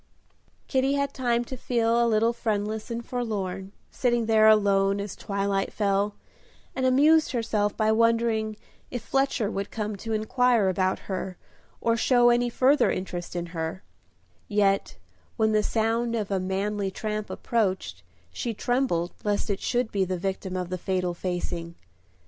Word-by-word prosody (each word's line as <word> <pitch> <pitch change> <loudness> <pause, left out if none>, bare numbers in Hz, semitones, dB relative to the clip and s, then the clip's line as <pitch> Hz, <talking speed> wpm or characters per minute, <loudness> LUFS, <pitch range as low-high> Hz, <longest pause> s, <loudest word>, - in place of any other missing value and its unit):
Kitty 265 0 +1
had 280 0 0
time 240 -2 0
to 260 - -6
feel 235 -1 +1
a 235 - +2
little 225 +1 +3
friendless 215 -1 -2
and 235 0 -4
forlorn, 195 -6 -3 0.2
sitting 240 -2 +1
there 220 -1 +5
alone 200 -2 +4
as 200 -1 -5
twilight 200 -1 -1
fell, 200 0 0 0.6
and 260 -1 +1
amused 300 +4 +4
herself 215 -3 0
by 215 -1 +3
wondering 225 -1 +2 0.3
if 245 -3 -5
Fletcher 270 -5 0
would 195 -1 -3
come 210 -1 -3
to 225 +3 -6
inquire 220 -1 +2
about 185 0 +1
her, 185 -1 -4 0.4
or 230 0 +2
show 240 +1 +4
any 240 0 +2
further 265 +5 +3
interest 180 -2 -4
in 175 -1 -2
her; 165 +3 -4 0.6
yet 200 -2 +1 0.4
when 220 -1 +3
the 215 0 +3
sound 230 +2 0
of 210 -3 -2
a 195 - +1
manly 195 +2 -1
tramp 215 +2 -4
approached, 190 - -1 0.3
she 235 -2 -3
trembled 215 -8 0
lest 205 0 0
it 195 - -2
should 245 -2 -1
be 195 -2 +1
the 185 0 -2
victim 190 0 -3
of 180 -1 -3
the 185 0 -3
fatal 180 -1 -1
facing. 175 -1 -4
215 Hz, 155 wpm, -26 LUFS, 195-235 Hz, 0.6 s, there